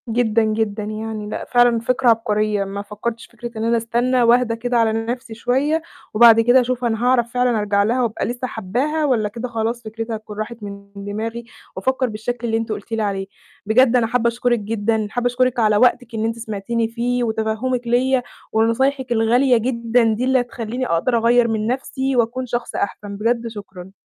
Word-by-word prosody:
جدًا 230 -1 +2
جدًا 215 -1 -1
يعني. 215 0 -5
لأ - - -5
فعلًا 245 -1 +3
فكرة 250 +2 +1
عبقرية. 215 -2 +1
ما 195 +1 -5
فكرتش 220 +3 -5
في - - -25
فكرة 240 0 -6
إن 220 - -2
أنا 230 +1 +2
أستنى 240 +2 +1
وأهدى 235 0 +3
كده 245 +1 -1
على 225 -1 +3
نفسي 230 +1 -4
شوية، 270 +8 0 0.3
وبعد 230 +1 +7
كده 245 +3 +5
أشوف 250 0 -2
أنا 225 0 -1
هاعرف 240 -2 +2
فعلًا 245 -2 +2
أرجع 205 -1 +2
لها 240 +5 +1
وأبقى 225 -2 -2
لسه 245 +1 -3
حاباها، 255 +10 -1
والّا 230 -7 +1
كده 235 +4 -5
خلاص 230 +1 -2
فكرتها 225 +1 -5
هتكون 215 -1 -9
راحت 225 +2 -4
من 200 0 -8
دماغي، 220 +4 -5 0.3
وأفكر 260 -1 0
بالشكل 235 +3 -4
اللي 225 0 +1
أنتِ 225 -1 -3
قلتِ 210 +1 -6
لي 225 -1 -1
عليه. 195 -2 -2 0.4
بجد 240 +3 +4
أنا 235 -2 +3
حابة 235 0 +1
أشكرِك 240 0 +1
جدًا. 215 +1 -1
حابة 245 +2 -1
أشكرِك 250 0 +1
على 215 -2 +3
وقتِك 245 0 +2
إن 220 0 -1
أنتِ 225 0 -2
سمعتيني 225 +1 -2
فيه، 245 +2 -1
وتفهمِك 225 +2 -1
ليَّ، 255 +2 +2 0.3
ونصايحِك 255 +4 +1
الغالية 240 +3 +3
جدًا 235 0 +1
دي 225 +3 -2
اللي 260 0 +3
هتخليني 245 +1 -4
أقدر 200 +9 +1
أغيّر 235 +1 +4
من 220 -1 -1
نفسي، 265 +1 -2
وأكون 245 +2 0
شخص 240 0 -4
أحسن. 200 0 -3
بجد 230 +2 0
شكرًا. 190 -4 -9
230 Hz, 185 wpm, -20 LUFS, 220-245 Hz, 0.4 s, وبعد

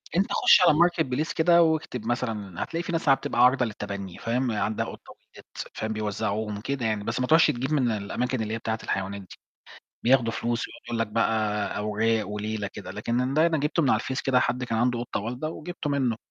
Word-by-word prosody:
أنت 190 +3 +1
خُشّ - - +6
على 170 -4 +5
marketplace 160 -4 +1
كده 170 +1 +5
واكتب 155 -8 -1
مثلًا 110 -6 -2
هتلاقي 165 +1 -4
في - - -4
ناس 165 -3 0
عم 135 - +7
بتبقى - - 0
عارضة 125 0 +5
للتبني، 100 -4 -6
فاهم، 125 +2 -1
عندها 110 0 -1
قطة - - -10 0.2
ولدت، - - -9
فاهم 110 0 -3
بيوزعوهم 105 0 -2
كده 135 +1 -3
يعني، 110 -2 -1
بس 115 +4 -2
ما 125 - 0
تروحش 160 +3 +6
تجيب 130 +1 -3
من 130 -5 +2
الأماكن 115 +4 -2
اللي 110 0 -3
هي - - -1
بتاعة 110 0 -3
الحيوانات 100 +1 -3
دي، 95 - -13 0.7
بياخدوا 120 -2 +4
فلوس 120 +1 -2
ويقعد - - -13
يقول 120 -1 -3
لك 115 - +1
بقى 105 -1 0
أوراق 105 0 0
وليلة 105 0 -3
كده، 100 -3 -8
لكن 120 +5 -1
ده 155 +2 +5
أنا 165 -2 +1
جبته 150 +4 +1
من 135 - +3
على 110 - +3
الفيس 130 +1 -3
كده 130 -2 +3
حد 125 0 0
كان 115 -2 -2
عنده 120 +1 +1
قطة 120 - -3
والدة 125 +8 -4
وجبته 165 -1 -5
منه. 130 -5 +1
120 Hz, 210 wpm, -26 LUFS, 110-135 Hz, 0.7 s, عم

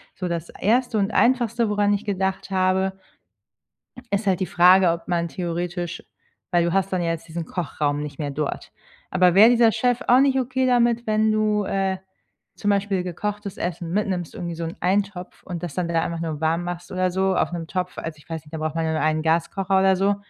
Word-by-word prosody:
so 185 - -4
das 170 -1 -3
1. 240 +2 +1
und 200 +1 +1
Einfachste, 235 -2 +2
woran 205 0 +2
ich 205 +2 -2
gedacht 190 -1 -2
habe, 190 0 +1 1.1
ist 200 +1 -1
halt 185 -1 +2
die - - +2
Frage, 180 0 +5
ob 170 0 -5
man 170 -1 0
theoretisch, 175 0 -4 0.5
weil 175 -1 +3
du 170 - 0
hast 195 0 +1
dann 180 - +1
ja 170 - 0
jetzt 165 0 -5
diesen 165 0 -5
Kochraum 145 -4 -2
nicht 145 -2 -8
mehr 145 -2 -2
dort, 150 0 -4 0.4
aber 180 -1 +4
wäre 220 +4 +8
dieser 235 -2 +5
Chef 245 +2 0
auch 250 - +6
nicht 270 -1 +3
okay 260 +1 0
damit, 240 -1 +2
wenn 215 0 +2
du, 215 -1 +1
äh, 190 -1 -1 0.6
zum 205 - -2
Beispiel 200 -2 0
gekochtes 205 +3 -4
Essen 170 -1 -4
mitnimmst, 190 -5 -2
irgendwie 170 -2 -5
so 165 - -4
'n 165 - -6
Eintopf 190 0 -1
und 175 -2 -6
das 175 -5 -5
dann 180 -2 -1
wieder 165 -1 +1
einfach 170 -1 -3
nur 160 -2 -4
warm 165 +2 +1
machst 175 0 -6
oder 185 0 0
so 190 +1 +1
auf - - +1
'nem 165 -2 -4
Topf, 180 0 -3
also, 160 -2 -5
ich 150 - -21
weiß 160 -1 -5
nicht, 150 - -18
da - - -3
braucht 155 0 -3
man 165 0 0
ja 160 - 0
nur 155 - -1
einen 155 0 +1
Gaskocher 190 +4 +1
oder 190 0 +4
so. 195 +2 +2
185 Hz, 215 wpm, -23 LUFS, 170-205 Hz, 1.1 s, wäre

